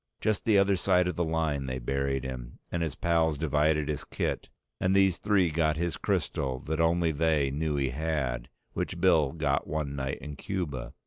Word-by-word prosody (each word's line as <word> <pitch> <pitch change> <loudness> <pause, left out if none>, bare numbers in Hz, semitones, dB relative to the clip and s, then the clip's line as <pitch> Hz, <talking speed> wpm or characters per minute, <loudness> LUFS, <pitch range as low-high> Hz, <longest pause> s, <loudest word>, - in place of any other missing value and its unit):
Just 110 -2 0
the 110 -3 +5
other 100 0 +4
side 90 0 +3
of 90 - -2
the 85 - 0
line 80 -4 -1
they 65 0 -2
buried 70 +1 -1
him, 65 -2 -6
and 85 - -1
his 80 -3 -2
pals 80 -3 +1
divided 75 0 +2
his 75 -2 -2
kit, - - -3 0.3
and 95 +1 +2
these 95 -2 +4
three 100 -5 +2
got 80 0 +1
his 85 -1 -1
crystal 65 -1 -1
that 80 +1 -1
only 85 0 +3
they 75 -3 +1
knew 75 +1 -1
he 70 -2 +1
had, 65 -4 -2 0.2
which 85 - -3
Bill 80 -6 +4
got 75 -4 0
one 75 -2 -2
night 65 -1 -2
in 75 -1 -8
Cuba. 85 -10 -4
80 Hz, 190 wpm, -29 LUFS, 70-85 Hz, 0.3 s, the